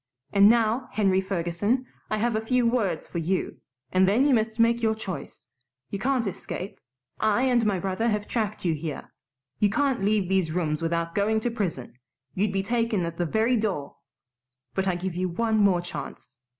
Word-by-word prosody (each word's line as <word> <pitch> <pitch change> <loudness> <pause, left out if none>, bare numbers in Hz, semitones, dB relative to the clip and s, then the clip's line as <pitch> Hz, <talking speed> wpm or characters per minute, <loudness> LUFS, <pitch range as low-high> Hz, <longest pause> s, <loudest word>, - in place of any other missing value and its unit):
And 200 0 +7
now, 235 +2 +2
Henry 195 -3 +2
Ferguson, 190 +7 -1 0.2
I've 215 +2 0
a 220 - 0
few 245 +2 +1
words 220 -9 0
for 170 - -4
you, 180 +3 -1 0.3
and 185 +1 +4
then 235 +7 +3
you 290 - +4
must 220 -1 +1
take 230 0 +3
your 220 -1 +2
choice. 195 -5 -7 0.5
You 200 - -3
can't 255 0 +1
escape. 195 0 -5 0.4
I 220 +3 +2
and 245 -3 +3
my 200 -2 +1
brother 190 +5 -1
have 210 -1 -1
tracked 215 -4 -2
you 170 - +2
here. 155 -1 -6 0.5
You 205 - +4
can't 270 +2 +1
leave 205 -2 +2
these 185 -4 +1
rooms 155 -3 -1
without 165 0 -1
going 215 +2 +2
to 240 - -1
prison. 170 - -4 0.3
You'd 200 +2 0
be 195 0 -1
taken 230 -4 0
at 170 0 -5
the 175 - 0
very 225 +7 +2
door. 195 -10 -2 0.8
But 190 0 -1
I 185 - +1
give 180 +1 -3
you 185 +1 -1
one 220 +5 0
more 195 -4 +4
chance. 140 -6 -8
205 Hz, 185 wpm, -26 LUFS, 180-230 Hz, 0.8 s, And